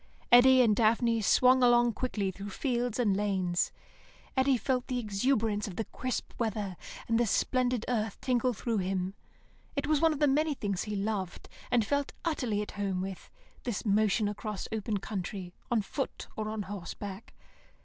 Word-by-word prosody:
Eddy 255 +1 +8
and 215 -3 +4
Daphne 230 +1 +3
swung 255 +4 +5
along 240 -1 +5
quickly 210 -5 -2
through 200 +2 -7
fields 245 +1 -1
and 215 -6 +2
lanes. 190 -3 0 0.6
Eddy 265 0 +3
felt 255 +1 -1
the 250 - -1
exuberance 215 -1 0
of 190 - -7
the 225 - -2
crisp 255 -1 -4
weather 210 -5 -2 0.3
and 230 0 +2
the 240 - +2
splendid 250 +1 +1
earth 220 -4 -1
tingle 250 -1 +1
through 230 -1 -2
him. 185 0 -1 0.6
It 280 0 -1
was 300 -1 +2
one 325 -1 +5
of 305 - -2
the 295 - +4
many 295 +2 +2
things 200 -6 -2
he 210 -1 -3
loved, 195 -3 -3 0.2
and 235 -3 +3
felt 285 +4 -1
utterly 245 -10 0
at - - -8
home 195 -2 -2
with, 190 0 -6 0.3
this 235 -4 -3
motion 210 -1 +3
across 210 -1 -4
open 220 -1 -1
country, 190 -2 -5 0.2
on 230 -3 +2
foot 270 +6 -4
or 215 0 -3
on 215 -1 -3
horse 195 -2 -6
back. 200 +2 -8
220 Hz, 170 wpm, -30 LUFS, 200-250 Hz, 0.6 s, Eddy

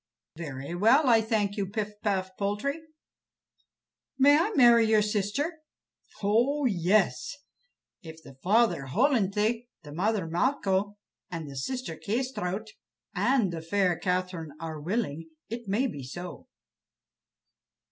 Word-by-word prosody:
"Very 145 -2 -6
well, 230 - +4
I 225 -2 +6
thank 215 -2 0
you, 200 -2 -1
Pif 210 +1 -3
paf 190 -3 -1
Poltrie." 210 +11 -2 1.4
"May 280 +2 +6
I 335 +7 +3
marry 235 -4 +7
your 220 -1 +4
sister?" 210 - -1 0.6
"Oh, 245 +8 +2
yes! 195 +3 +1 0.7
if 160 -3 -11
the - - -12
father 190 - +2
Hollenthe, 225 - +1 0.2
the 150 - -10
mother 200 +2 0
Malcho, 200 - 0 0.3
the 160 -6 -6
sister 250 - -4
Kâsetraut, 220 -4 -2 0.5
and 235 -10 +2
the 165 - -4
fair 180 +1 +1
Catherine 180 -3 -2
are 160 -2 -6
willing, 165 -3 -2 0.2
it 230 0 -6
may 210 +7 +1
be 205 - -4
so." 175 +7 -8
205 Hz, 115 wpm, -28 LUFS, 175-235 Hz, 1.4 s, marry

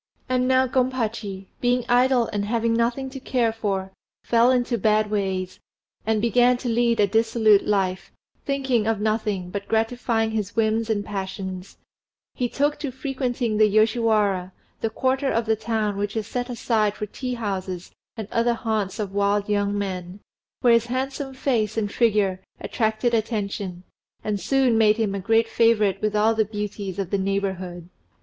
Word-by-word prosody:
And 255 0 +1
now 260 0 +4
Gompachi, 230 -6 -1
being 245 0 +1
idle 245 0 +4
and 205 -1 -1
having 230 +1 0
nothing 240 +3 0
to 270 - -7
care 245 -3 0
for, 195 -4 -2 0.3
fell 235 +1 +4
into 245 -2 +1
bad 215 +1 +2
ways, 190 -3 -2 0.5
and 220 -1 +2
began 245 +1 +4
to 245 0 -4
lead 235 0 +2
a 205 - +6
dissolute 220 0 +3
life, 190 -3 0 0.3
thinking 265 -5 0
of 225 -2 +1
nothing 210 -4 -1
but 200 0 -5
gratifying 225 0 0
his 210 -3 -3
whims 225 0 +1
and 205 -2 0
passions; 190 -1 -5 0.6
he 245 -1 -2
took 290 +3 0
to 290 - -3
frequenting 255 -4 -2
the 215 0 +6
Yoshiwara, 215 -4 +2 0.3
the 225 - -1
quarter 265 +4 0
of 230 0 0
the 220 0 +2
town 215 -2 -2
which 205 +2 -2
is 220 - -2
set 245 +3 -4
aside 220 -3 0
for 210 - -4
tea 250 +4 -5
houses 190 -5 -4 0.3
and 220 -3 -5
other 235 +1 +2
haunts 220 -4 -2
of 205 -3 -4
wild 200 0 +1
young 205 -1 0
men, 185 -1 -4 0.4
where 240 -2 +5
his 230 0 +3
handsome 265 +2 -3
face 225 -5 0
and 205 -2 -1
figure 205 -5 +1 0.2
attracted 220 +1 -1
attention, 200 -5 -2 0.4
and 210 -1 -1
soon 255 +2 +2
made 215 -1 +4
him 215 -3 0
a 200 - -2
great 225 +4 +2
favourite 215 -4 +2
with 215 0 0
all 215 +2 +4
the 220 -1 +2
beauties 205 -2 -5
of 195 -3 -3
the 200 - +1
neighbourhood. 190 -3 -3
220 Hz, 165 wpm, -24 LUFS, 200-240 Hz, 0.6 s, a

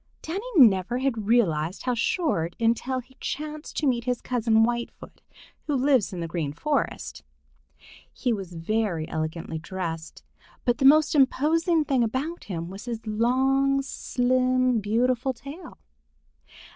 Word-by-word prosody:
Danny 390 +9 -4
never 225 - +5
had 245 -6 -1
realized 180 -7 +1
how 250 - 0
short 230 - 0
until 235 +3 0
he 260 +2 -24
chanced 305 +1 -5
to 305 - 0
meet 240 -3 +1
his 250 -2 0
cousin 225 -3 +2
Whitefoot, 235 +1 -4 0.5
who 295 - 0
lives 260 -5 +2
in 180 -3 -5
the 165 - -3
Green 160 -4 -3
Forest. 280 - -2 0.9
He 245 -3 -1
was 190 -4 -6
very 170 -2 -1
elegantly 160 0 -4
dressed, 165 -2 -6 0.4
but 245 +3 +1
the 270 - +2
most 305 +2 +6
imposing 310 +4 +3
thing 265 -4 +2
about 270 +9 -3
him 170 -4 -4
was 195 +5 -9
his 230 -2 -5
long, 265 +5 +2
slim, 255 -2 +1
beautiful 245 +5 +1
tail. 280 +9 -10
240 Hz, 135 wpm, -25 LUFS, 200-270 Hz, 0.9 s, most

